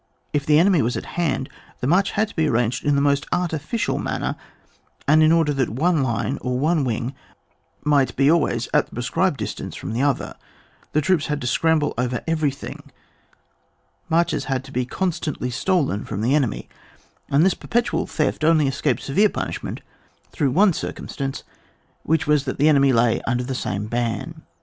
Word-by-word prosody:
If 145 Hz, -1 st, -1 dB
the 150 Hz, 0 st, +5 dB
enemy 175 Hz, -1 st, +4 dB
was 120 Hz, 0 st, 0 dB
at -, -, -5 dB
hand, 155 Hz, -6 st, -1 dB, 0.3 s
the -, -, -3 dB
march 185 Hz, +8 st, +2 dB
had 215 Hz, +1 st, +1 dB
to -, -, -14 dB
be 160 Hz, -2 st, +2 dB
arranged 120 Hz, -1 st, 0 dB
in 145 Hz, -1 st, +2 dB
the 140 Hz, -, +2 dB
most 140 Hz, 0 st, +1 dB
artificial 175 Hz, -, -1 dB
man -, -, -3 dB
ner, -, -, -2 dB, 0.7 s
and 155 Hz, +2 st, +5 dB
in 155 Hz, 0 st, +5 dB
order 165 Hz, -3 st, +3 dB
that 135 Hz, -3 st, 0 dB
one 155 Hz, +7 st, +1 dB
line 130 Hz, +2 st, -1 dB
or 125 Hz, -1 st, -1 dB
one 155 Hz, +3 st, +2 dB
wing 120 Hz, +1 st, -2 dB, 0.7 s
might 145 Hz, -3 st, +2 dB
be 140 Hz, +2 st, +4 dB
always 165 Hz, -2 st, +1 dB
at -, -, +3 dB
the -, -, -20 dB
prescribed -, -, 0 dB
distance -, -, -5 dB
firom -, -, -5 dB
the 120 Hz, -, -1 dB
other, 140 Hz, -1 st, 0 dB, 0.6 s
the 155 Hz, -, +3 dB
troops 160 Hz, -1 st, +1 dB
had 150 Hz, -1 st, -1 dB
to -, -, -4 dB
scramble 155 Hz, +4 st, +2 dB
over 125 Hz, 0 st, -1 dB
everything: 150 Hz, -4 st, -2 dB, 1.2 s
marches 170 Hz, +1 st, +1 dB
had 135 Hz, -1 st, -2 dB
Ibo 125 Hz, -2 st, -2 dB
constantly 160 Hz, -4 st, -2 dB
to -, -, -6 dB
be -, -, -4 dB
stolen 150 Hz, -, +1 dB
from 100 Hz, -, -4 dB
the 120 Hz, +5 st, +2 dB
ene 140 Hz, -5 st, +3 dB
my, -, -, -7 dB, 0.6 s
and 145 Hz, +5 st, +4 dB
this 190 Hz, -, +4 dB
perpetual 240 Hz, 0 st, -1 dB
theft 155 Hz, 0 st, -1 dB
only 155 Hz, -2 st, +4 dB
escaped 135 Hz, -2 st, -1 dB
severe 200 Hz, +10 st, +3 dB
punishment -, -, -5 dB, 0.5 s
through 145 Hz, -5 st, 0 dB
one 195 Hz, +9 st, +4 dB
circusi -, -, -5 dB
stance, 135 Hz, -1 st, -4 dB, 0.6 s
which 160 Hz, +2 st, +1 dB
was, 150 Hz, -2 st, +2 dB
that 130 Hz, -, -3 dB
the 150 Hz, +3 st, +4 dB
enemy 140 Hz, -2 st, +5 dB
lay 115 Hz, -1 st, +2 dB
under 125 Hz, 0 st, 0 dB
the 130 Hz, +2 st, -4 dB
same 105 Hz, -5 st, -3 dB
ban. 120 Hz, +8 st, -3 dB
145 Hz, 190 wpm, -22 LUFS, 130-160 Hz, 1.2 s, the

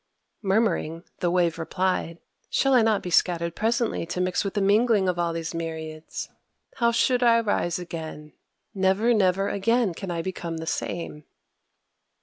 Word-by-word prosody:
Murmuring, 190 Hz, -5 st, 0 dB, 0.2 s
the 175 Hz, -, +1 dB
Wave 170 Hz, -2 st, +1 dB
replied: 180 Hz, 0 st, -1 dB, 0.3 s
"Shall 270 Hz, 0 st, +2 dB
I 250 Hz, -, +6 dB
not 220 Hz, -2 st, +2 dB
be 180 Hz, -, -5 dB
scattered 170 Hz, -1 st, +2 dB
presently 230 Hz, -5 st, 0 dB
to 175 Hz, +1 st, -4 dB
mix 180 Hz, 0 st, 0 dB
with 195 Hz, 0 st, -4 dB
the -, -, +2 dB
mingling 205 Hz, 0 st, +3 dB
of 180 Hz, -1 st, 0 dB
all 170 Hz, -1 st, +1 dB
these 165 Hz, 0 st, -4 dB
myriads? 160 Hz, -1 st, -5 dB, 0.5 s
How 235 Hz, -2 st, +3 dB
should 245 Hz, +2 st, +2 dB
I 235 Hz, -1 st, +5 dB
rise 205 Hz, -6 st, 0 dB
again? 160 Hz, -3 st, -7 dB, 0.4 s
Never, 195 Hz, +4 st, +2 dB
never 195 Hz, -2 st, +2 dB
again 230 Hz, 0 st, +1 dB
can 190 Hz, +3 st, -7 dB
I 170 Hz, -1 st, -2 dB
become 170 Hz, -3 st, -4 dB
the 160 Hz, -, -5 dB
same." 160 Hz, -2 st, -4 dB
185 Hz, 155 wpm, -25 LUFS, 165-215 Hz, 0.5 s, I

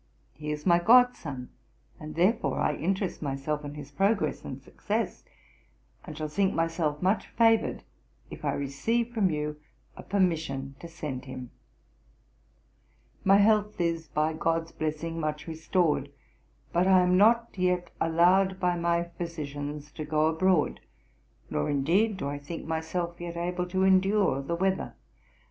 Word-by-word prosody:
He 150 Hz, 0 st, -7 dB
is 150 Hz, 0 st, -5 dB
my 170 Hz, -2 st, +5 dB
god 245 Hz, +6 st, +6 dB
son, 135 Hz, -5 st, -7 dB, 0.5 s
and 155 Hz, 0 st, -8 dB
therefore 200 Hz, +8 st, +2 dB
I -, -, +1 dB
interest 190 Hz, +3 st, -2 dB
myself 145 Hz, +1 st, -2 dB
in 145 Hz, 0 st, -7 dB
his 145 Hz, -1 st, -9 dB
progress 200 Hz, +7 st, +1 dB
and -, -, -6 dB
success, -, -, -3 dB, 0.8 s
and 155 Hz, -, -9 dB
shall 155 Hz, -1 st, -3 dB
think 190 Hz, +6 st, 0 dB
myself 165 Hz, -2 st, -1 dB
much 190 Hz, +4 st, +1 dB
favoured 225 Hz, -1 st, +2 dB, 0.5 s
if -, -, -9 dB
I -, -, 0 dB
receive 225 Hz, -, -1 dB
from 210 Hz, -5 st, +2 dB
you 150 Hz, -1 st, -3 dB, 0.4 s
a -, -, -9 dB
permission 160 Hz, -8 st, -1 dB
to 170 Hz, -, -8 dB
send 150 Hz, -6 st, -6 dB
him. 130 Hz, -2 st, -8 dB, 1.7 s
'My 195 Hz, +1 st, +6 dB
health 210 Hz, 0 st, +3 dB
is, 165 Hz, -2 st, -1 dB
by 155 Hz, +2 st, 0 dB
GOD'S 165 Hz, +1 st, -1 dB
blessing, 160 Hz, +2 st, -3 dB
much 150 Hz, -1 st, -3 dB
restored, 160 Hz, -3 st, 0 dB, 0.6 s
but 175 Hz, +2 st, +3 dB
I 190 Hz, -1 st, +6 dB
am 180 Hz, 0 st, +3 dB
not 230 Hz, +4 st, +5 dB
yet 180 Hz, -1 st, 0 dB
allowed 185 Hz, +4 st, +3 dB
by 180 Hz, -1 st, +1 dB
my 170 Hz, 0 st, +1 dB, 0.2 s
physicians 150 Hz, -3 st, -5 dB
to 155 Hz, -, -6 dB
go 155 Hz, 0 st, +1 dB
abroad; 160 Hz, 0 st, +2 dB, 0.7 s
nor, 75 Hz, -, -1 dB
indeed, 180 Hz, +10 st, +2 dB
do 140 Hz, -, -3 dB
I 145 Hz, 0 st, -4 dB
think 160 Hz, +4 st, -7 dB
myself 170 Hz, +2 st, -3 dB
yet 170 Hz, -1 st, -5 dB
able 180 Hz, +1 st, -2 dB
to 185 Hz, +1 st, 0 dB
endure 190 Hz, -4 st, +3 dB
the 155 Hz, +5 st, -2 dB
weather. 190 Hz, +2 st, -1 dB
170 Hz, 150 wpm, -28 LUFS, 150-190 Hz, 1.7 s, god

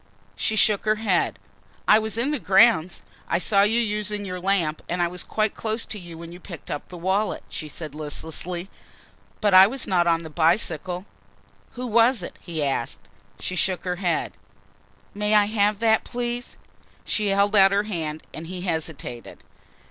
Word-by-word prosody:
She 220 Hz, -, 0 dB
shook 210 Hz, -1 st, +3 dB
her 215 Hz, 0 st, +3 dB
head. 205 Hz, -5 st, 0 dB, 0.5 s
"I 215 Hz, -, +7 dB
was 220 Hz, 0 st, -3 dB
in 255 Hz, +5 st, 0 dB
the 300 Hz, -, -1 dB
grounds 190 Hz, -5 st, +4 dB, 0.2 s
I -, -, +1 dB
saw 195 Hz, +3 st, +3 dB
you 215 Hz, +3 st, +3 dB
using 210 Hz, -2 st, -1 dB
your 180 Hz, -1 st, -5 dB
lamp 180 Hz, -5 st, 0 dB
and 180 Hz, -, -2 dB
I 175 Hz, -, +2 dB
was 180 Hz, -1 st, -4 dB
quite 215 Hz, +4 st, -1 dB
close 220 Hz, +1 st, -3 dB
to 215 Hz, -, -5 dB
you 170 Hz, -2 st, -10 dB
when 170 Hz, 0 st, -9 dB
you 175 Hz, -, -10 dB
picked 175 Hz, -3 st, -9 dB
up 145 Hz, -, -5 dB
the 180 Hz, -, -9 dB
wallet," 190 Hz, +3 st, -1 dB
she 155 Hz, -, -6 dB
said 150 Hz, 0 st, -7 dB
listlessly, 160 Hz, +4 st, -2 dB, 0.7 s
"but 205 Hz, -3 st, +2 dB
I 190 Hz, +1 st, +9 dB
was 260 Hz, +4 st, -2 dB
not 175 Hz, -2 st, +2 dB
on 165 Hz, 0 st, +2 dB
the 160 Hz, -, -9 dB
bicycle." 175 Hz, +2 st, +1 dB, 0.7 s
"Who 250 Hz, +1 st, -5 dB
was 230 Hz, -2 st, +3 dB
it?" -, -, -8 dB
he 165 Hz, -4 st, -3 dB
asked. 135 Hz, -4 st, -2 dB, 0.3 s
She 185 Hz, -, -3 dB
shook 185 Hz, +1 st, 0 dB
her 180 Hz, -1 st, -2 dB
head. 175 Hz, -2 st, -1 dB, 0.8 s
"May 210 Hz, +1 st, +1 dB
I 210 Hz, -1 st, +6 dB
have 210 Hz, -1 st, +1 dB
that 220 Hz, -1 st, +3 dB
please?" 245 Hz, 0 st, -4 dB, 0.5 s
She 210 Hz, -1 st, 0 dB
held 200 Hz, +1 st, +2 dB
out 195 Hz, -1 st, +7 dB
her 200 Hz, +1 st, +2 dB
hand 160 Hz, -7 st, -4 dB
and 160 Hz, +1 st, -7 dB
he 180 Hz, 0 st, -6 dB
hesitated. 160 Hz, -8 st, -5 dB
190 Hz, 180 wpm, -24 LUFS, 170-215 Hz, 0.8 s, I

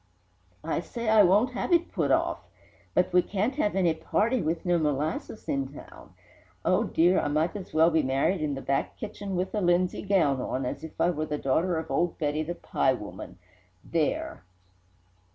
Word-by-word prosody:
I -, -, -1 dB
say 235 Hz, -2 st, -4 dB
I 220 Hz, -1 st, +7 dB
won't 205 Hz, +7 st, +4 dB
have 250 Hz, -, -3 dB
it 345 Hz, 0 st, +3 dB
put -, -, 0 dB
off! -, -, +1 dB, 0.6 s
But 180 Hz, 0 st, +2 dB
we 180 Hz, -, +6 dB
can't 210 Hz, +8 st, -1 dB
have 210 Hz, -10 st, 0 dB
any 180 Hz, -4 st, +3 dB
party 215 Hz, +9 st, 0 dB
with 160 Hz, +2 st, -2 dB
no 175 Hz, -1 st, +2 dB
molasses 155 Hz, -, -2 dB
in 135 Hz, -1 st, -1 dB
town! 145 Hz, -, -13 dB, 0.5 s
Oh, -, -, +3 dB
dear! 175 Hz, +3 st, +3 dB
I -, -, -1 dB
might 155 Hz, +5 st, 0 dB
as 195 Hz, -3 st, -7 dB
well 160 Hz, +2 st, +4 dB
be 160 Hz, 0 st, +3 dB
married 140 Hz, +6 st, 0 dB
in 145 Hz, -2 st, -1 dB
the 135 Hz, -, -7 dB
back 135 Hz, 0 st, -1 dB
kitchen 205 Hz, -2 st, -5 dB
with 180 Hz, +1 st, -2 dB
a 210 Hz, -, 0 dB
linsey 175 Hz, 0 st, +2 dB
gown 170 Hz, -10 st, +2 dB
on, 130 Hz, +1 st, -2 dB
as 125 Hz, -, -4 dB
if 160 Hz, -, -10 dB
I 175 Hz, -, +3 dB
were 155 Hz, -2 st, -3 dB
the 150 Hz, -, -2 dB
daughter 160 Hz, +6 st, +1 dB
of 160 Hz, -3 st, -5 dB
old 170 Hz, +5 st, 0 dB
Betty, 150 Hz, 0 st, -1 dB
the 170 Hz, +3 st, -4 dB
pie 130 Hz, -, +1 dB
woman! 105 Hz, -5 st, -8 dB, 0.5 s
There!" 155 Hz, -, -2 dB
170 Hz, 190 wpm, -27 LUFS, 150-195 Hz, 0.6 s, I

